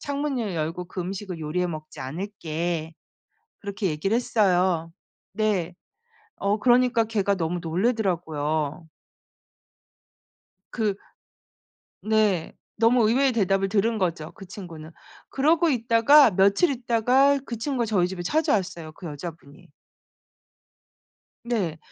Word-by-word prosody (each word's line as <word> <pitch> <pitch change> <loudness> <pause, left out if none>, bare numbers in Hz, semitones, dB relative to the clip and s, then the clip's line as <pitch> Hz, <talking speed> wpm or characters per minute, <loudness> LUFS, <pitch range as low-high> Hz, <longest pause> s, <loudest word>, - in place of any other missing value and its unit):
창문을 280 - -2
열고 165 +3 -3
그 185 - -6
음식을 185 0 -5
요리해 175 +4 -1
먹지 155 -5 -8
않을게." 165 +1 -4 0.7
그렇게 200 0 -4
얘기를 155 +8 -1
했어요. 185 -8 +1 0.4
네. 195 -5 0 0.6
어 200 +2 0
그러니까 245 0 +3
걔가 205 -3 0
너무 170 0 -2
놀라더라고요. 160 - -1 1.9
그 215 -4 0 1.1
네. 215 -6 +1 0.2
너무 230 0 +4
의외의 265 +2 +3
대답을 195 -3 +1
들은 220 +3 +1
거죠 170 -5 -2
그 195 - -12
친구는. 170 -5 -10 0.4
그러고 320 +4 +2
있다가 235 +1 +5
며칠 200 - +3
있다가 250 +3 +3
그 235 - -5
친구가 245 -1 -1
저희 190 -5 +1
집에 180 -1 -6
찾아왔어요 185 - 0
그 175 - -9
여자분이. 150 -1 -9 1.8
네. 195 -10 -1
195 Hz, 245 characters per minute, -25 LUFS, 170-230 Hz, 1.9 s, 있다가